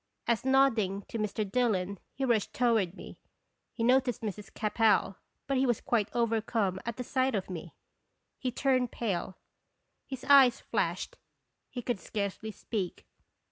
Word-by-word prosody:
As, 235 -2 +1
nodding 235 -8 +3
to 230 - -4
Mr. 210 0 -1
Dil 245 +4 +2
lon, 185 +1 -3 0.2
he 270 - -1
rushed 230 -5 +1
toward 225 -7 +2
me, - - -11 0.5
he 230 - -4
noticed 250 -1 +2
Mrs. 210 -1 -5
Capel, 210 -2 +2 0.3
but 275 -1 0
he 265 - +3
was 240 -3 +1
quite 220 -3 0
overcome 225 -4 0
at 235 - -3
the 250 - -3
sight 260 0 0
of 190 -1 -3
me. 170 -2 -7 0.6
He 255 - -2
turned 255 -1 +1
pale, 190 -4 -3 0.7
his 265 -2 -7
eyes 270 -3 +6
flashed, - - -2 0.5
he 245 - -6
could 240 -4 -1
scarcely 205 +2 -4
speak. 205 -3 -4
225 Hz, 150 wpm, -30 LUFS, 200-250 Hz, 0.7 s, eyes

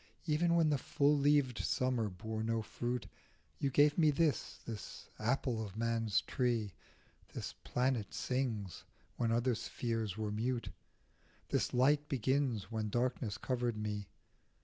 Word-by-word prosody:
Even 170 +2 +2
when 160 -2 +4
the 145 - +2
full 145 +3 +3
leaved 140 -4 +3
Summer 125 -4 +1
bore 110 +4 -5
no 115 0 0
fruit 120 +2 -3 0.5
You 140 - +1
gave 145 +4 +4
me 155 -2 +6
this, 150 0 +1
this 110 -3 -7
apple 120 0 0
of 105 -1 -8
man's 115 -2 +1
tree; 115 -6 0 0.6
This - - -5
planet 125 -4 0
sings 115 -8 -2 0.3
when 115 -2 +1
other 120 +2 +2
spheres 115 -3 -2
were 110 -1 -2
mute, 120 +3 -1 0.8
This - - +1
light 145 +4 +3
begins 130 -5 0
when 110 -1 -1
darkness 120 -2 -1
covered 120 -3 -1
me. 105 -2 -3
120 Hz, 135 wpm, -35 LUFS, 110-135 Hz, 0.8 s, me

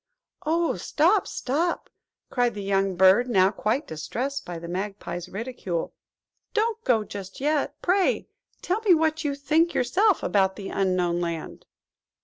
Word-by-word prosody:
"Oh, 335 +2 +1
stop, 360 +7 +2
stop!" 320 +7 -1 0.4
cried 245 -3 +1
the 205 - -5
young 195 -1 +1
bird, 190 +7 +5
now 190 -4 +4
quite 220 +8 -1
distressed 260 - -4
by 175 -1 -6
the 170 +1 -8
Magpie's 185 -1 -5
ridicule; 195 -6 -4 0.6
"don't 450 +1 0
go 225 -4 +2
just 195 -2 -8
yet, 295 +1 0
pray. 370 +1 +2 0.4
Tell 375 +5 0
me 395 -6 +5
what 315 0 +1
you 285 -2 -1
think 315 +4 +1
yourself 370 - +2
about 190 -2 +2
the 200 -2 -7
Unknown 180 -3 0
Land." 170 -2 -5
240 Hz, 140 wpm, -25 LUFS, 190-315 Hz, 0.6 s, bird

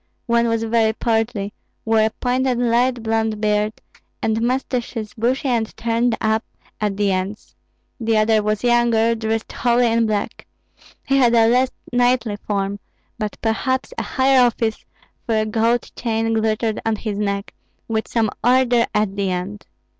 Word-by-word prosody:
One 235 -1 +2
was 230 0 0
very 225 -1 +2
portly, 225 -3 -1 0.3
wore 225 0 +3
a - - +2
pointed 250 +2 0
light 240 0 +1
blond 220 -1 0
beard, 210 0 +1 0.5
and 220 0 +1
mustaches 240 -3 -2
bushy 250 +4 0
and 230 -3 -1
turned 230 0 0
up 220 +1 +1 0.4
at 205 -2 -1
the 205 -1 +2
ends; 190 +3 -4 0.4
the 225 -1 +1
other 215 0 +3
was 210 +1 -1
younger, 235 -1 +3
dressed 225 0 -2
wholly 240 0 +2
in 230 0 +2
black. 210 -1 -3 0.6
He 275 - +2
had 240 -3 +4
a 225 -1 +5
less 250 +2 +3 0.2
knightly 245 -3 +2
form, 200 -1 -3 0.4
but 215 -2 -3
perhaps 260 +4 -1
a - - -2
higher 265 0 +3
office, 230 -2 +1 0.4
for 225 - +1
a 215 - +1
gold 230 +2 0
chain 225 -1 -1
glittered 220 0 0
on 225 -1 0
his 210 -1 -4
neck, 200 -1 -2 0.3
with 220 -1 -1
some 225 -3 0
order 245 -1 +3
at 210 -2 +1
the 200 -1 -1
end. 185 +3 -4
225 Hz, 155 wpm, -20 LUFS, 215-240 Hz, 0.6 s, a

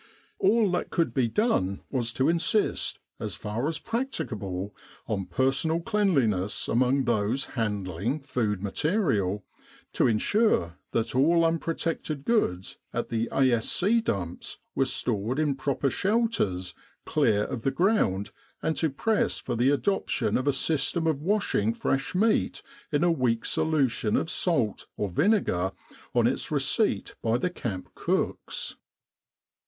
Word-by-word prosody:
All 230 - +3
that 180 - -1
could 165 -8 0
be 125 -2 +2
done 110 - +1
was 120 -4 0
to 130 +3 +1
insist, 170 +6 +1 0.2
as - - -3
far 110 +6 -3
as 160 -1 -2
practicable, 110 - -3 0.3
on 95 -3 -2
personal 135 +5 +1
cleanliness 140 - +1
among 130 +3 +2
those 115 +3 +1
handling 105 - -2
food 110 -8 -1
material, 105 - 0 0.5
to - - +3
ensure 110 - +2
that 115 -1 -1
all 165 +6 +4
unprotected 165 -3 -2
goods 95 - 0
at - - -3
the 115 0 -1
A.S.C. 135 - +2
dumps 90 - -3 0.2
were 135 - +2
stored 120 -1 -1
in 150 -2 +2
proper 135 0 -1
shelters 190 - 0 0.3
clear 105 -1 +2
of 115 - -4
the 135 - +1
ground, 135 - +1 0.3
and 160 - +1
to 160 - +2
press 210 +10 0
for 125 - -4
the 120 +3 +3
adoption 170 +8 0
of 130 - 0
a - - +5
system 160 +4 0
of 155 -3 +1
washing 165 - +1
fresh 135 +6 -1
meat 215 +4 +2 0.3
in 145 +1 +2
a 175 - +4
weak 125 -7 0
solution 135 -9 +1
of - - -1
salt 135 - 0
or 105 - -1
vinegar 95 - +1 0.4
on - - +4
its - - 0
receipt - - +1
by 115 +1 +2
the 180 +8 -1
camp 100 - -5
cooks. - - -2
135 Hz, 135 wpm, -27 LUFS, 105-170 Hz, 0.5 s, a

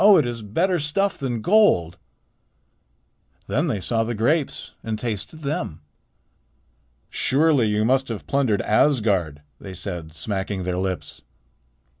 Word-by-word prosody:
it 150 - +3
is 120 -1 -4
better 170 - 0
stuff 175 +8 +1
than 120 -5 -3
gold." 175 - +3 1.5
Then 150 +6 0
they 115 -9 -1
saw 115 +5 0
the 115 +1 -3
grapes 140 +7 0
and 110 -1 -3
tasted 115 +7 -5
them. 140 - -3 1.3
"Surely 140 -4 +3
you 105 0 +1
must 135 +2 +2
have 115 -3 -5
plundered 130 -7 +1
Asgard," 100 - +2 0.2
they 95 -2 -8
said, 85 -4 -4
smacking 95 +2 -3
their 90 0 -2
lips. 95 -1 -4
115 Hz, 125 wpm, -23 LUFS, 95-145 Hz, 1.5 s, it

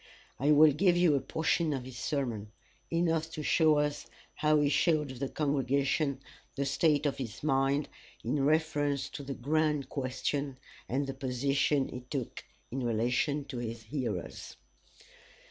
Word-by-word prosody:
I 145 +3 +3
will 150 +1 +7
give 175 +4 +3 0.2
a 140 - +3
portion 160 +2 0
of 135 -3 -3
his 125 -1 -8
sermon 120 -9 -2 0.4
enough 165 -1 +1
to 155 - -4
show 155 0 +4
us 145 0 -1 0.3
how 150 0 +3
he 145 - +3
showed 150 0 +2
the 130 +1 -4
congregation 140 -1 0 0.3
the 140 - -1
state 150 +1 +2
of 145 - 0
his 115 -2 -6
mind 135 0 +2 0.4
in 145 -2 0
reference 145 -2 +1
to - - -7
the 135 -1 -5
grand 150 0 0
question, 135 +1 -2 0.3
and 140 +3 0
the 135 - -4
position 135 +1 +1
he 125 - -6
took 125 0 -5 0.3
in 130 - -3
relation 125 +5 0
to 135 -3 -6
his 115 -1 -5
hearers. 110 - -4
140 Hz, 145 wpm, -31 LUFS, 130-150 Hz, 0.4 s, will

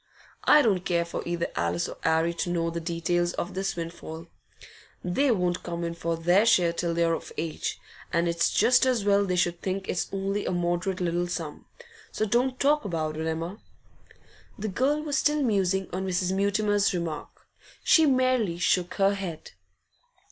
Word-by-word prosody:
I 300 0 +7
don't 195 -6 +2
care 170 -2 +1
for 170 - -5
either 170 0 -1
Alice 85 0 0
or - - -7
'Arry 160 +1 +2
to 170 +1 -3
know 165 -1 0
the 170 - -3
details 175 +1 -1
of 175 - -4
this 195 +1 -2
windfall. 165 -1 -7 0.8
They 225 +11 +1
won't 180 -5 +1
come 170 -1 -4
in 170 0 -2
for 170 0 -2
their 175 +5 +4
share 175 -6 +4
till 170 0 -2
they're 170 0 +2
of - - -5
age, 160 0 -3 0.3
and 170 +1 +1
it's 170 0 +1
just 255 +1 +4
as 240 -6 +1
well 200 0 +4
they 180 - 0
should 175 -1 0
think 190 0 -3
it's 180 - -2
only 195 +1 -2
a - - 0
moderate 175 +1 -1
little 175 0 0
sum. 165 -3 -6 0.4
So 215 - -1
don't 250 +4 +1
talk 295 +2 +3
about 160 -6 -2
it, 160 +1 -3
Emma.' 165 +6 -3 1.0
The 215 +1 -3
girl 280 +9 +1
was 300 -1 0
still 295 0 +2
musing 195 -5 +1
on 190 +1 -2
Mrs. 185 0 0
Mutimer's 200 0 +1
remark; 165 -4 -5 0.4
she 320 -2 +5
merely 255 -9 +2
shook 180 0 +1
her 195 0 +3
head. 185 -5 -6
180 Hz, 175 wpm, -27 LUFS, 170-205 Hz, 1.0 s, I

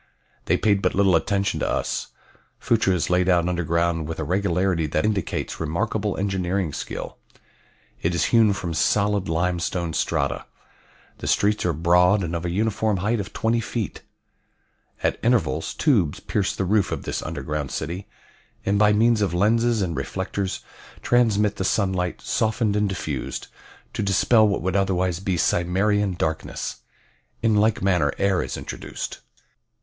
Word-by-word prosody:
They - - +2
paid 100 -2 +2
but - - 0
little 95 -2 +4
attention 100 +4 0
to - - -1
us. - - -1 0.5
Phutra 105 -5 +2
is 90 - -1
laid 90 +1 +3
out 85 -1 +3
underground 85 -2 0
with 80 - -5
a - - -2
regularity 90 -3 0
that 75 +3 0
indicates 105 -5 -2
remarkable 105 +5 -1
engineering 95 -3 -1
skill. - - -6 0.8
It 85 +1 0
is 85 - +1
hewn 110 -3 +5
from 85 -4 -4
solid 100 +5 +1
limestone 85 0 -1
strata. - - -1 0.7
The - - -5
streets 105 -2 +2
are - - +2
broad 90 +5 +3
and 85 0 -3
of 85 +1 -3
a - - -1
uniform 105 +2 0
height 105 +5 0
of 100 +2 -5
twenty 115 +1 0
feet. 115 -1 -4 1.0
At - - +1
intervals 100 -10 +1
tubes 105 - +2
pierce 100 -2 -1
the 95 - -1
roof 105 +1 +2
of - - -3
this - - -3
underground 75 -2 -4
city, 90 +5 -4 0.6
and 100 +1 +2
by 105 0 +5
means 115 +1 +3
of 95 -4 0
lenses 115 +3 +2
and 85 -3 -2
reflectors 95 +6 -3 0.4
transmit 105 -4 +2
the - - -1
sunlight, 95 -2 0
softened 110 -2 0
and 105 -1 +1
diffused, 75 -8 -4 0.4
to - - -2
dispel 105 +3 +4
what 100 -4 -1
would 95 +1 -1
otherwise 95 -3 +1
be 95 -2 -1
Cimmerian 95 +4 +1
darkness. 80 -2 -3 0.7
In 110 -2 +3
like 105 -1 +2
manner 90 -7 +2
air 100 -2 +2
is - - -4
introduced. - - -6
95 Hz, 155 wpm, -23 LUFS, 85-105 Hz, 1.0 s, hewn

